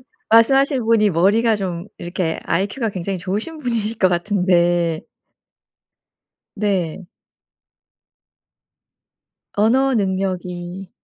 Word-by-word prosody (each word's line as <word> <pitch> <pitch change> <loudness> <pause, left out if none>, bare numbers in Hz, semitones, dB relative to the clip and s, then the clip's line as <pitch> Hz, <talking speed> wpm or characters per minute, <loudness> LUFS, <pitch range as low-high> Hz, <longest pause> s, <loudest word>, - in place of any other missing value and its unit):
지금 - - -21 0.3
말씀하시는 265 +2 +4
분이 215 -2 +3
머리가 210 +7 +3
좀 180 -3 -4
이렇게 175 -1 -3
아이큐가 200 +7 -1
굉장히 190 0 -4
좋으신 210 - -4
분이실 230 -5 -2
것 190 - +4
같은데. 175 -3 +1 1.5
네. 195 -4 -2 2.5
언어 255 +6 +2
능력이 185 -2 -3
195 Hz, 210 characters per minute, -20 LUFS, 175-225 Hz, 2.5 s, 말씀하시는